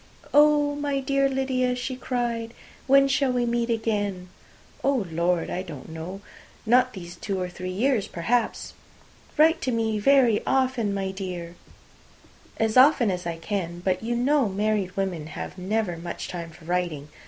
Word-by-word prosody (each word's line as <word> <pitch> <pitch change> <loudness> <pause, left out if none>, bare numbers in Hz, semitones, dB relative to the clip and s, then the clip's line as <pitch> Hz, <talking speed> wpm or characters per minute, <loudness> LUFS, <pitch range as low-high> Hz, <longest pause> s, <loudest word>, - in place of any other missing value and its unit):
"Oh, 295 0 +5
my 290 -1 -1
dear 275 0 +1
Lydia," 260 -2 0
she 250 +1 -4
cried, 240 -2 -3 0.3
"when 275 +1 +6
shall 270 -1 +2
we 245 -1 +1
meet 235 0 0
again?" 205 -5 -1 0.5
"Oh, 270 -7 +1
Lord! 170 +1 0
I 180 - -2
don't 155 -8 -9
know. 165 +5 -7 0.4
Not 250 +3 +4
these 175 -3 -8
two 195 +2 -3
or 180 - -2
three 185 +1 -6
years, 220 +3 +1
perhaps." 225 +7 -1 0.6
"Write 325 +2 +5
to 255 - -1
me 225 -2 0
very 245 -2 +4
often, 255 -5 +1
my 195 -1 -2
dear." 180 -3 -6 1.0
"As 220 +1 +1
often 255 -5 +6
as 180 -1 -4
I 165 -1 -3
can. 175 -1 -3
But 185 -1 +1
you 235 +2 -2
know 260 0 +2
married 200 -1 -1
women 180 -6 -2
have 165 - -7
never 195 -1 -1
much 170 +1 -6
time 170 -2 -6
for 160 0 -16
writing. 170 -4 -2
215 Hz, 160 wpm, -25 LUFS, 180-255 Hz, 1.0 s, when